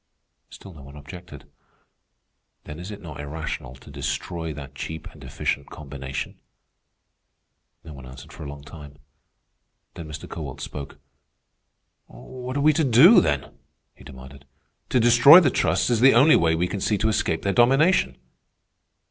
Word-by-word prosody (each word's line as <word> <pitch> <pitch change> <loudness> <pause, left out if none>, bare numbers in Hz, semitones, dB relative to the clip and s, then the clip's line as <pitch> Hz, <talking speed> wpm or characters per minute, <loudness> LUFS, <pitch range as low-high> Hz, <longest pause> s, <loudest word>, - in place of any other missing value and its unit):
Still 95 - -13
no 75 - -14
one 70 +1 -14
objected. 75 0 -12 1.2
"Then 75 +2 -10
is 90 +3 -8
it 105 -2 -10
not 75 -4 -10
irrational 75 -4 -6
to 65 - -16
destroy 75 +4 -5
that 70 -2 -10
cheap 80 +3 -7
and - - -15
efficient 70 - -4
combination?" 70 -3 -7 1.4
No 80 -3 -11
one 65 -2 -12
answered 65 +4 -13
for - - -12
a 70 - -7
long 70 0 -10
time. 75 -1 -13 1.0
Then 85 -3 -9
Mr. 75 0 -9
Kowalt 75 -6 -8
spoke. 70 -2 -8 1.1
"What 130 +1 -8
are - - -1
we 155 +1 +4
to 160 - 0
do, 140 - +7
then?" 70 -2 -3 0.4
he - - -18
demanded. 65 0 -13 0.4
"To 130 - +2
destroy 120 +8 +8
the 150 -8 +2
trusts 85 +7 0
is 115 - +1
the 130 0 +5
only 140 +6 +6
way 80 -1 +2
we 85 +2 -1
can 100 +1 -5
see 105 - 0
to 110 - -1
escape 95 -7 -1
their 100 - 0
domination." 135 +9 +3
80 Hz, 155 wpm, -23 LUFS, 70-115 Hz, 1.4 s, destroy